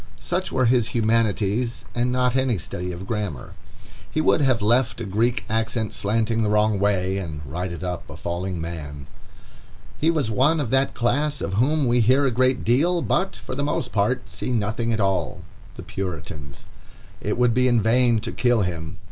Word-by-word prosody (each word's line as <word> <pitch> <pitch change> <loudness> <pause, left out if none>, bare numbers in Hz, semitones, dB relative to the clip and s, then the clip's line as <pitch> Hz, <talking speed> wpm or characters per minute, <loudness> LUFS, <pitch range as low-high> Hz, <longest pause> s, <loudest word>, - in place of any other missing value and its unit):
Such - - -2
were 130 - +2
his 120 -1 +2
humanities, 115 +1 +1
and 120 +1 0
not 125 0 +1
any 130 -4 +2
study 90 +2 -5
of 90 +2 -7
grammar. 105 - -4 0.6
He - - -2
would 155 - +3
have 130 -4 +3
left 115 +4 +2
a 115 - -4
Greek 115 +6 0
accent 110 0 -1
slanting 115 +2 0
the 105 - +1
wrong 105 -1 +2
way, 95 -1 +1
and 80 -5 -5
righted 85 +5 -4
up 90 -1 -4
a - - -9
falling 90 +1 -3
man. 75 -4 -6 0.9
He 160 - +2
was 150 -9 +1
one 145 +8 +3
of 130 -6 -2
that 135 +1 +2
class 145 +5 +1
of 95 - -3
whom 135 +7 +2
we 120 +1 +3
hear 130 +5 +4
a 135 - +2
great 130 +2 +1
deal, 165 +9 +3
but, 190 +3 0
for - - -8
the 140 +2 -2
most 140 -4 -1
part, 105 +1 0
see 95 +7 -4
nothing 115 +1 -1
at 110 - 0
all—the 95 -4 -3
Puritans. 75 -6 -6 0.6
It - - -2
would 125 -1 +3
be 125 +1 +3
in 120 -2 +4
vain 115 +1 +3
to - - -4
kill 120 -4 +2
him. 80 -4 -4
115 Hz, 180 wpm, -23 LUFS, 95-125 Hz, 0.9 s, hear